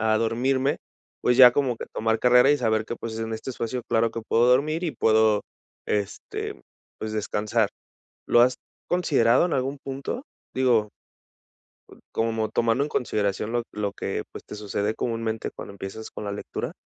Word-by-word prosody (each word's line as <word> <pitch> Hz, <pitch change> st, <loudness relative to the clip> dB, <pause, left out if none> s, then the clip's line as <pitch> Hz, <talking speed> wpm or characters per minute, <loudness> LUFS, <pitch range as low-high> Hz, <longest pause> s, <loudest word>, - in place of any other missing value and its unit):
a 110 Hz, 0 st, +2 dB
a -, -, +3 dB
dormirme, 130 Hz, +5 st, +1 dB, 0.4 s
pues, 125 Hz, -, +2 dB
ya 125 Hz, -1 st, +10 dB
como 130 Hz, -3 st, +1 dB
que -, -, -7 dB
tomar 110 Hz, 0 st, 0 dB
carrera 125 Hz, +3 st, +6 dB
y 145 Hz, -, +3 dB
saber 110 Hz, -3 st, +1 dB
que, 120 Hz, -, -4 dB
pues, 115 Hz, -1 st, -6 dB
en 115 Hz, 0 st, -3 dB
este 110 Hz, +4 st, -5 dB
espacio 120 Hz, 0 st, -3 dB
claro 115 Hz, 0 st, +2 dB
que 115 Hz, -, -5 dB
puedo 115 Hz, +2 st, +3 dB
dormir 150 Hz, +7 st, +2 dB
y 165 Hz, -, -1 dB
puedo, 110 Hz, -2 st, +3 dB, 0.4 s
este, 100 Hz, -2 st, -3 dB, 0.4 s
pues, 110 Hz, 0 st, -4 dB
descansar". 110 Hz, +1 st, 0 dB, 0.6 s
¿Lo 120 Hz, -, +6 dB
has 125 Hz, +1 st, +4 dB, 0.3 s
considerado 140 Hz, -8 st, +3 dB
en 175 Hz, -, -1 dB
algún 135 Hz, +2 st, -1 dB
punto?, 140 Hz, -, -5 dB, 0.3 s
digo 120 Hz, -5 st, +2 dB, 1.3 s
como 115 Hz, -1 st, 0 dB
tomando 115 Hz, +3 st, +1 dB
en -, -, -4 dB
consideración 105 Hz, -4 st, -1 dB
lo 120 Hz, 0 st, +1 dB
lo 105 Hz, -1 st, -2 dB
que, -, -, -3 dB
pues, -, -, -9 dB
te -, -, -9 dB
sucede 105 Hz, 0 st, -2 dB
comúnmente 115 Hz, -2 st, -2 dB
cuando -, -, -9 dB
empiezas 100 Hz, +3 st, -7 dB
con -, -, -7 dB
la 100 Hz, -, -3 dB
lectura. 100 Hz, -, -5 dB
115 Hz, 170 wpm, -25 LUFS, 110-125 Hz, 1.3 s, ya